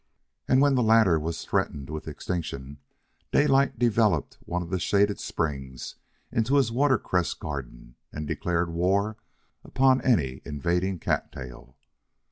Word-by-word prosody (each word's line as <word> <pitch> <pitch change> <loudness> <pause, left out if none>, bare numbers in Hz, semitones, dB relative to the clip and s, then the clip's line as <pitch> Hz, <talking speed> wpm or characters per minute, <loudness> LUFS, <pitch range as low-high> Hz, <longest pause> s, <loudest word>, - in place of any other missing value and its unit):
And 130 +1 +4
when 145 -1 +4
the 130 - +2
latter 110 -7 +5
was 80 +2 -4
threatened 70 0 -2
with 80 0 -6
extinction, 70 -6 -5 0.5
Daylight 140 -3 +3
developed 110 -8 +1
one 90 +1 -2
of 85 - -10
the 95 - 0
shaded 100 +3 +2
springs 65 -5 -4 0.4
into 115 +5 +1
his 135 -5 +3
water 130 +1 +3
cress 90 -4 -1
garden - - -7 0.2
and 75 0 -5
declared 85 +2 -1
war 100 +5 +1 0.5
upon 130 0 +3
any 70 - +1
invading 90 +6 -1
cattail. 65 -5 -4
90 Hz, 130 wpm, -26 LUFS, 75-115 Hz, 0.5 s, latter